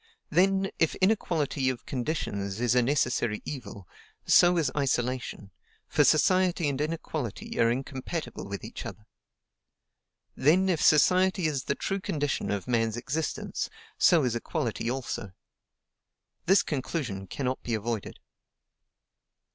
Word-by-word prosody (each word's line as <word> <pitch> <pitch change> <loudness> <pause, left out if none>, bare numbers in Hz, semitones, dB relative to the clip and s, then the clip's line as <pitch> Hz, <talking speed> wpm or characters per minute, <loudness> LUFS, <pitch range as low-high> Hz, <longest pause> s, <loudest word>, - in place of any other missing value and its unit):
Then, 190 +3 +3
if 165 - +2
inequality 160 -9 +1
of 125 -2 -5
conditions 110 -7 -3
is 120 -1 +2
a 125 - +4
necessary 120 -4 0
evil, 105 -9 -7 0.4
so 175 0 +6
is 150 -5 +1
isolation, 125 -6 -1 0.4
for - - +3
society 180 +2 +3
and 140 0 -2
inequality 155 -7 -4
are 115 - +5
incompatible 130 - -4
with 100 0 -6
each - - -7
other. 105 - -9 1.3
Then, 180 +8 +3
if 170 -4 +1
society 185 +4 +4
is 145 -5 -1
the 140 - 0
true 195 - -2
condition 145 -6 -2
of 100 +1 -2
man's 115 -2 +1
existence, 140 +6 -3 0.3
so 165 -4 +5
is 120 -2 0
equality 115 0 -2
also. 120 -6 -4 1.1
This 195 +3 +5
conclusion 130 - -3
cannot 130 +6 -3
be 115 - -2
avoided. 110 0 -4
135 Hz, 125 wpm, -28 LUFS, 120-165 Hz, 1.3 s, so